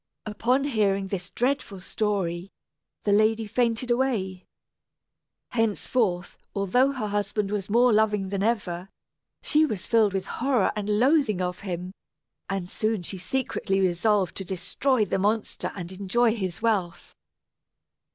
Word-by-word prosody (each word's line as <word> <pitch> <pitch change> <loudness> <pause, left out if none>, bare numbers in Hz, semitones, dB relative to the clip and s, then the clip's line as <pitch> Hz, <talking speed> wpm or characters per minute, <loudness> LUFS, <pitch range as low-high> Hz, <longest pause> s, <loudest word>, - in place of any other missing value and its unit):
Upon 235 +6 +1
hearing 200 -7 +1
this 185 -1 -4
dreadful 245 -6 -1
story, 190 -3 -2 0.5
the 205 - +1
lady 215 +2 +3
fainted 235 +2 0
away. 220 -8 -1 1.0
Henceforth, 220 -4 0 0.2
although 225 +8 +3
her 255 -6 -3
husband 205 0 -1
was 205 -2 -2
more 240 +2 +5
loving 210 -2 +2
than 195 0 -2
ever, 195 -5 -1 0.5
she 305 0 +3
was 215 - -2
filled 220 -4 +3
with 190 -1 -2
horror 250 -3 +1
and 210 0 0
loathing 255 - +3
of 180 0 -2
him; 180 -1 -5 0.6
and 195 -2 -2
soon 215 0 -1
she 190 +2 -6
secretly 195 -3 -1
resolved 190 +2 +2
to 195 - -4
destroy 195 +7 0
the 195 - -1
monster 210 +3 -1
and 180 -2 -6
enjoy 215 +5 +1
his 190 -2 -4
wealth. 195 -6 -1
205 Hz, 130 wpm, -26 LUFS, 190-230 Hz, 1.0 s, more